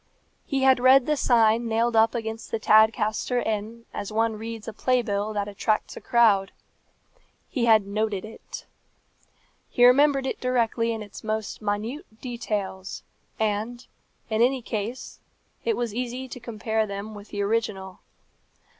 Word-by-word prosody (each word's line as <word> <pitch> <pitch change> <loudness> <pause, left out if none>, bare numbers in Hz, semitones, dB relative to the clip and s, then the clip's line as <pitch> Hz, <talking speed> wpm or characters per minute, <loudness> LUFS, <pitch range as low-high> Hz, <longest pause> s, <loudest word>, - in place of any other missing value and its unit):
He 270 -2 0
had 265 -1 +5
read 260 +1 +6
the 305 - +1
sign 230 -3 +3
nailed 230 +1 +1
up 225 +2 +4
against 225 -1 -4
the - - -1
Tadcaster 220 +2 +3
Inn 220 +1 -3
as 200 - -5
one 225 +1 +1
reads 225 0 -7
a 225 - -5
play 250 +3 +1
bill 205 -1 -2
that 205 -1 -2
attracts 210 +1 -1
a - - -8
crowd. 210 -5 +3 1.0
He 250 -5 -1
had 220 -3 +5
noted 210 -1 -2
it. 220 - -10 1.0
He 245 - +4
remembered 275 +2 +5
it 265 - -3
directly 235 -2 +1
in 220 -1 -4
its 205 - -11
most 215 0 -3
minute 220 - -4
details; 210 -6 -4 0.4
and, 220 +3 -2 0.4
in 220 0 0
any 255 +1 +2
case, 225 +3 -5 0.5
it 455 - +1
was 235 -3 -2
easy 250 +2 -4
to 250 - -8
compare 220 -1 -2
them 200 +2 -6
with 205 0 -11
the 205 -1 -2
original. 200 -3 -2
225 Hz, 150 wpm, -25 LUFS, 215-240 Hz, 1.0 s, read